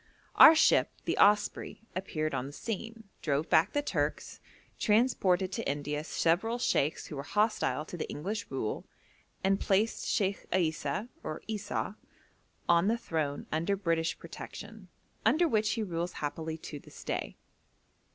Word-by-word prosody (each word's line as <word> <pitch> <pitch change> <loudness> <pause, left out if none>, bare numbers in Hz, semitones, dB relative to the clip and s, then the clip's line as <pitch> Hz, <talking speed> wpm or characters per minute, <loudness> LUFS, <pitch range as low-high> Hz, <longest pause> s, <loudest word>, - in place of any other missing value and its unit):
Our 320 - +10
ship - - +5 0.2
the - - 0
Osprey 210 +1 +3
appeared 155 -5 -2
on 130 - -2
the - - -8
scene, 225 +4 -5 0.2
drove 145 +1 -1
back 160 - +5
the 290 - +1
Turks, - - -2 0.4
transported 200 -5 +2
to - - -2
India 145 +1 -2
several 175 +9 +1
sheikhs 155 - +1
who 150 - -7
were - - -2
hostile 155 - 0
to 175 - -7
the - - -4
English 200 +9 -4
rule, 130 -5 -3 0.6
and 195 +1 +3
placed 205 +3 +1
Sheikh 200 -2 0
Isa 160 +1 0
(or 155 0 -5
Esau) 215 -2 -3 0.7
on 170 +2 +4
the 230 +2 +2
throne 155 -10 -2
under 170 +6 +1
British 165 -4 0
protection, - - -9 0.4
under 340 +2 +4
which 215 -6 +2
he 225 - -1
rules 175 -2 -3
happily 160 +2 -4
to 150 -2 -8
this - - -13
day. - - -3
180 Hz, 145 wpm, -31 LUFS, 155-215 Hz, 0.7 s, Our